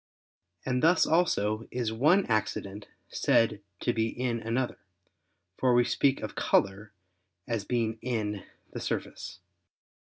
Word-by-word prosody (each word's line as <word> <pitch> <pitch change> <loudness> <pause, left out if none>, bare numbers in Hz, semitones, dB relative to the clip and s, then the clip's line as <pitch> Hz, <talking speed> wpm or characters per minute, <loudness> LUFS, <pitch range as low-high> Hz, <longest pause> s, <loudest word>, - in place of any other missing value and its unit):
And 125 -1 0
thus 165 +2 +5
also 115 - +1
is 120 -3 -2
one 155 - +4
accident 105 -2 -2 0.2
said 115 -3 +2 0.2
to 120 - +1
be 110 -1 +1
in 120 0 -2
another; 115 +3 -2 0.8
for 125 -2 +3
we 120 - +5
speak 135 +2 +1
of 110 - -5
color 100 +2 +1 0.6
as 115 -4 -2
being 115 -2 -1
in 105 -5 -2 0.3
the - - -4
surface. - - -4
115 Hz, 125 wpm, -29 LUFS, 110-125 Hz, 0.8 s, thus